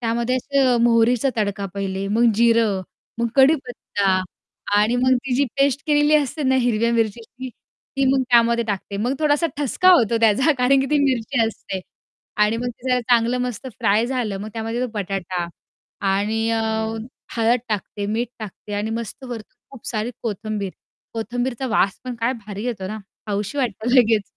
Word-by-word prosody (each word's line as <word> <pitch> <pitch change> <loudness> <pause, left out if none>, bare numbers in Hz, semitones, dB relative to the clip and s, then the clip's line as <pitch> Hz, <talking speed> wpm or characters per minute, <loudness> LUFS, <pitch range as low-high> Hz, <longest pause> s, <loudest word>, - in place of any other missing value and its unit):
त्यामध्ये 235 +1 0
असं 260 -1 +2
मोहरीचा 235 +2 +3
तडका 200 -2 -1
पहिले, 195 0 -3
मग 230 +2 +3
जिरं, 230 -3 +3 0.4
मग 235 - +1
कढीपत्ता 245 -9 +2 0.5
आणि 215 +4 +3
मग 255 +1 +3
ती 250 - 0
जी 280 - +3
पेस्ट 275 0 +3
केलेली 295 0 +4
असते 295 +1 -1
ना 265 0 +2
हिरव्या 235 -1 +1
मिरचीची 230 +3 -2 0.5
ती 275 - +2
मग 265 - +2
त्यामध्ये 235 0 +4
टाकते 200 -1 -4
मग 240 +6 0
थोडासा 305 +1 +2
ठसका 295 +6 +2
होतो 230 - +4
त्याचा 230 +8 +4
कारण 265 +2 +4
की 270 - 0
ती 300 - +3
मिरची 255 -1 0
असते 195 -3 -5 0.6
आणि 215 +2 0
मग 245 +1 -2 0.2
जला 250 -1 +2
चांगलं 240 +1 +2
मस्त 250 +1 -4
फ्राय 215 +4 +2
झालं 240 -7 -2
मग 215 - -5
त्यामध्ये 225 +1 -3
तो - - +1
बटाटा 185 -3 -3 0.6
आणि 220 +3 0
अ, 225 -1 +1 0.7
हळद 230 +2 +3
टाकते, 205 -1 -3
मीठ 225 +4 -1
टाकते 210 -1 -9
आणि 210 +2 -2
मस्त 230 +3 -5
वरतून 235 -4 -9
खूप 270 -4 -13
सारी 220 +1 -2
कोथिंबीर, 210 -2 -3 0.4
कोथिंबीरचा 245 +3 -2
वास 200 -4 +1
पण 250 - -4
काय 230 +3 0
भारी 205 +1 -6
येतो 220 -6 -3
ना 215 +3 -5 0.3
खाऊशी 205 +6 -3
वाटते 245 -1 -1
लगेच. 220 -2 +2
230 Hz, 165 wpm, -22 LUFS, 210-255 Hz, 0.7 s, केलेली